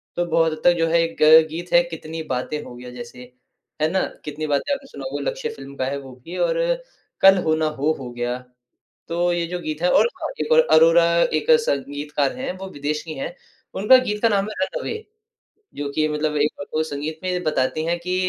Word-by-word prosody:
तो 175 - 0
बहुत 165 -1 +2
हद 155 - -8
तक 175 - +6
जो 165 - +2
है 165 +1 +3
एक 165 0 -4
ग 160 +1 +8
गीत 170 +3 -6
है 175 - +7
कितनी 165 -1 -7
बातें 140 +4 -3
हो 120 - -10
गया 125 +1 -10
जैसे, 125 0 -10 0.5
है 155 - +3
ना? 190 +1 +1 0.2
कितनी 155 +1 -4
बातें 145 - 0
आपने 275 -1 -6
सुना - - -9
होगा - - -2
लक्ष्य - - -4
फ़िल्म 140 - -10
का 130 - -2
है 140 +2 -2
वो 135 -1 -11
भी 175 - -7
और - - +1 0.6
कल 195 0 +8
हो 155 - +2
ना 160 0 0
हो 150 0 0
हो 130 -2 -6
गया। 120 +1 -2 0.7
तो 175 +1 0
ये 170 -1 0
जो 180 +1 -4
गीत 155 -2 -5
है 180 - +3
और - - +5
हाँ, - - -2
एक - - -3
और 480 - +7
अरोरा 165 +1 +6 0.2
एक 250 - 0 0.2
संगीतकार 145 - -1
है 260 +1 -3
वो 190 +1 -7
विदेशी 150 +1 -4
हैं, 175 - -5 0.4
उनका 210 +7 +6
गीत 210 -5 -2
का 230 - +4
नाम 200 -2 +1
है 215 - -7
रन - - -5
अवे, 450 - -3 0.8
जो 145 0 -3
कि 155 0 +2
मतलब 150 0 -1
एक 150 - +2 0.3
संगीत 155 +1 -5
में 180 -1 -1
बताती 155 -1 0
है 170 +1 0
कि 180 +1 -3
160 Hz, 220 wpm, -22 LUFS, 150-180 Hz, 0.8 s, ग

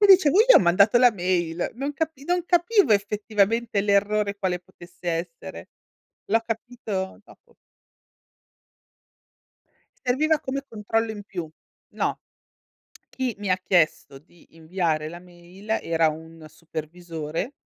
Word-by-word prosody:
Mi 410 - +6
dicevo: 370 -7 +7 0.2
"Io - - +10
ho - - +9
mandato 195 +6 +4
la 245 -2 +6
mail." 175 -3 -1
Non 275 +4 -3
capi 290 -1 -4
non 355 +1 0
capivo 350 - +3
effettivamente 210 +2 +1
l'errore, 205 0 +1
quale 185 -3 -1
potesse 175 0 -11
essere. 165 - -6 0.6
L'ho 225 +2 +2
capito 225 -4 -4
dopo. 475 -1 -21 2.5
Serviva 300 +5 +2
come 275 +1 -4
controllo 225 +1 -1
in 205 -2 -8
più. 175 -5 -6 0.5
No. - - -1 0.9
Chi 260 -2 -2
mi 205 -2 -4
ha 185 - +3
chiesto 170 -6 +1
di 165 +2 -24
inviare 160 -2 -1
la 175 - -9
mail, 180 +3 -16
era 165 -1 +2
un 160 +1 -10
supervisore 165 - -6
200 Hz, 120 wpm, -24 LUFS, 170-235 Hz, 2.5 s, Io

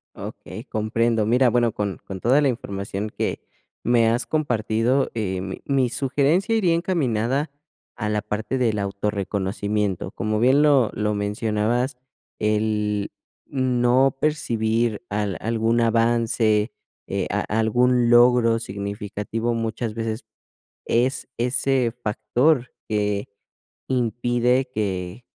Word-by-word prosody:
Okey, - - -8
comprendo. 110 +1 0
Mira, 125 +4 +4
bueno, 120 -1 +2
con 100 -2 -3
con 95 -1 -7
toda 130 +8 +4
la 145 - +3
información 100 -3 -4
que - - -2 0.4
me 120 -1 +3
has 120 +3 +1
compartido, 125 -3 +1
eh, 95 -5 -2
mi 95 0 -6
mi 135 -3 +2
sugerencia 140 - +1
iría 185 -7 +3
encaminada 140 - 0 0.5
a 105 -3 -2
la 105 0 0
parte 105 +4 -3
del 115 -4 +1
auto 100 +1 -1
reconocimiento. 100 -1 -2
Como 110 +1 -2
bien 130 +5 +4
lo 140 -6 +4
lo 105 0 -1
mencionabas, 110 +5 -1 0.4
el 105 -1 0 0.4
no 130 0 +2
percibir 115 -7 0
al 105 -2 -2
algún 115 +1 +1
avance, 115 -1 +2 0.3
eh, - - -2
a - - 0
a 110 - 0
algún 120 +2 +3
logro 120 -1 +5
significativo, 105 +2 -4
muchas 115 0 -3
veces 115 0 -3 0.6
es 125 +3 0
ese 125 0 +1
factor 120 +5 +1 0.2
que 105 -1 -1 0.6
impide 120 +1 +1
que 95 +1 -3
115 Hz, 120 wpm, -23 LUFS, 105-125 Hz, 0.6 s, logro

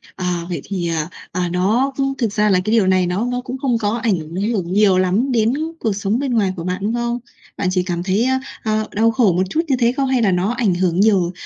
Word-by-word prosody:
à, 180 -2 -2
vậy 175 - -3
thì, 185 -4 -3
à, 160 -1 -2 0.2
à, 180 0 -1
nó 220 +10 +1 0.3
thực 230 -5 0
ra 210 0 +2
là 185 -2 +4
cái 215 - 0
điều 210 -5 +3
này 185 -1 +3
nó 185 +6 -1
nó 245 0 -2
cũng 255 +1 -6
không 255 -3 0
có 215 0 -1
ảnh 220 -4 +2 0.4
hưởng 185 -4 -2
nhiều 200 -2 +4
lắm 190 +9 +1
đến 230 -1 +2 0.3
cuộc 220 -3 0
sống 205 +3 -1
bên 270 -3 -1
ngoài 200 -5 +1
của 170 - -6
bạn, 180 +1 -2
đúng 210 +3 -1
không? 240 0 -1 0.4
Bạn 195 - -1
chỉ 185 -1 +1
cảm 175 -2 -3
thấy, 195 +4 +1
a, 260 0 +1 0.2
ơ, 215 -1 0
đau 225 +2 +3
khổ 220 -5 +3
một 180 +2 +1
chút 315 - +1
như 270 - +2
thế 235 -1 +3
không? 270 +1 -1
Hay 260 -2 +2
là 205 -4 +3
nó 180 +4 +1
ảnh 220 -7 +2
hưởng 175 -1 0
nhiều, 195 -4 +3
205 Hz, 255 wpm, -19 LUFS, 185-235 Hz, 0.4 s, là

